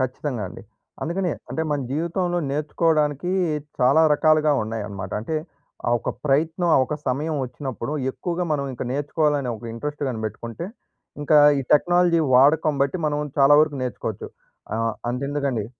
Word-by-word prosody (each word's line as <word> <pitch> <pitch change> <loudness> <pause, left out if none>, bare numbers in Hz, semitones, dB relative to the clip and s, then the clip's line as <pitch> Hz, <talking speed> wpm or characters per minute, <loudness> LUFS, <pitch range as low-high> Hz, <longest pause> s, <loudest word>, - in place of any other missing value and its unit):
ఖచ్చితంగా 130 -2 -2
అండి. - - -11 0.4
అందుకనే 175 +2 -1 0.2
అంటే 160 - -2
మన 145 -1 0
జీవితంలో 175 +3 -1
నేర్చుకోవడానికి, 150 +1 0 0.5
చాలా 130 +6 +5
రకాలుగా 155 0 +3
ఉన్నాయన్నమాట. 105 -3 -5
అంటే 155 +9 -3 0.5
ఆ - - +1
ఒక - - -2 0.2
ప్రయత్నం, 160 +5 +1
ఆ - - +5
ఒక 150 - -3
సమయం 150 +5 -1
వచ్చినప్పుడు, 130 0 -5 0.2
ఎక్కువగా 175 +5 -3
మనం 140 -2 0
ఇంక 125 - -6
నేర్చుకోవాలనే 145 -1 0
ఒక 115 - -13
ఇంట్రెస్ట్ 145 +6 -5
కాని 115 -4 -4
బెట్టుకుంటే, 115 - -6 0.6
ఇంకా 150 +1 +5 0.2
ఈ - - -3
టెక్నాలజీ 175 +2 +3
వాడకం 150 +4 +5
బట్టి 140 +4 0
మనం 150 0 -2
చాలా 140 +1 +7
వరకు 155 -2 -1
నేర్చుకోవచ్చు. 115 -4 -4 0.5
ఆహ్, 115 -1 -1 0.2
అంతెందుకండి... 140 -3 -2
145 Hz, 140 wpm, -23 LUFS, 125-160 Hz, 0.6 s, చాలా